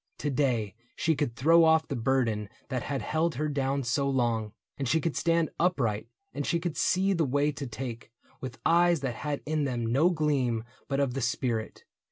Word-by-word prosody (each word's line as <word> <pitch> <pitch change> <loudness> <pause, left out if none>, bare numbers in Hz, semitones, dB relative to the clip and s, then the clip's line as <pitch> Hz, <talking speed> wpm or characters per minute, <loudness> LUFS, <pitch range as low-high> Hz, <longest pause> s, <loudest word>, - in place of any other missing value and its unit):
To 145 - -2
day 125 -7 0 0.2
she 160 -1 +1
could 145 -5 -2
throw 165 +6 +5
off 160 0 +4
The 140 - -3
burden 115 -4 0 0.2
that 130 -3 -1
had 140 +1 -3
held 160 +1 0
her 150 +3 -1
down 140 -1 -1
so 140 +3 0
long. 115 -5 0 0.2
And 135 - -3
she 160 - +3
could 160 0 -2
stand 165 -2 +1
upright, 115 - +1 0.3
and 145 - -3
she 170 +4 0
could 170 -2 -3
see 190 +2 +2
The 165 -3 +1
way 145 +2 +1
to 140 -1 -6
take, 120 0 -6 0.3
with 130 - -7
eyes 170 -1 +4
that 130 -3 -2
had 145 +4 -4
in 155 -1 0
them 120 -3 -2
No 135 +10 +3
gleam 140 -9 0 0.2
but 140 0 -1
of 140 -3 +1
the 135 - -2
spirit. 120 -2 -2
140 Hz, 200 wpm, -28 LUFS, 120-155 Hz, 0.3 s, throw